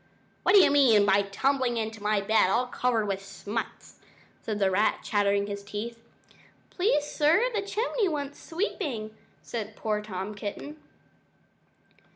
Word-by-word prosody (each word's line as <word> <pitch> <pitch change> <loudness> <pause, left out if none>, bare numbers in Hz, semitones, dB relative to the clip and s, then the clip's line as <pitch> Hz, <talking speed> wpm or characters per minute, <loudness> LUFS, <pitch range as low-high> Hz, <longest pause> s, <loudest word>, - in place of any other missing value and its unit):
"What 370 - +4
do - - +10
you - - +5
mean 245 -8 +5
by 200 0 +4
tumbling 245 +5 0
into 220 -1 -4
my 210 0 +1
bed 200 -2 +3
all 235 +6 +2
covered 245 -3 0
with 195 -1 -3
smuts?" 205 +3 -6 0.4
said 215 -2 -3
the 195 -2 +2
rat, 205 +3 +1
chattering 200 -1 +1
his 200 0 -6
teeth. 225 +3 -6 0.7
"Please, 360 -6 +1
sir, 330 +12 +2
the 425 - 0
chimney 425 +1 -1
wants 285 -2 -5
sweeping," 290 - -3 0.3
said 220 -2 -5
poor 215 -1 -2
Tom 200 0 -5
Kitten. 210 +9 -7
220 Hz, 145 wpm, -27 LUFS, 205-285 Hz, 0.7 s, do